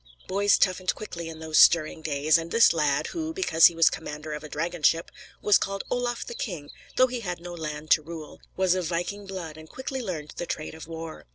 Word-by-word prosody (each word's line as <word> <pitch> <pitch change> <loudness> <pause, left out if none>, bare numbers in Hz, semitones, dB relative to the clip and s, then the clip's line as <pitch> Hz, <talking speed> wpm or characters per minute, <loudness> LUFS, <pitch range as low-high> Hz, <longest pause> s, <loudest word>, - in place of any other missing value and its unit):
Boys 200 +1 +3
toughened 185 -1 +1
quickly 170 -6 -7
in 160 - -8
those 160 -1 +1
stirring 160 -1 +5
days, 150 0 +2
and 165 0 -6
this 230 -4 +5
lad, 150 -4 +1
who, 320 -1 -4
because 270 - +6
he 170 - -3
was 165 0 +5
commander 150 0 -6
of 150 - -6
a 155 - -8
dragon 170 +3 -3
ship, 165 +2 +2 0.3
was 210 - +5
called 195 0 -3
Olaf 245 -1 -1
the - - -7
King 180 - -5 0.2
though 255 - +6
he 250 -1 -4
had 180 -6 -4
no 175 +1 -8
land 155 -2 -6
to - - +6
rule 155 -1 -9 0.2
was 185 -1 +3
of 185 -3 -1
viking 180 +4 -3
blood, 170 -5 -6
and 155 0 -12
quickly 265 0 -5
learned 165 -9 -5
the 175 - -4
trade 155 - -4
of 160 -1 -10
war. 165 - -8
170 Hz, 220 wpm, -26 LUFS, 155-195 Hz, 0.3 s, because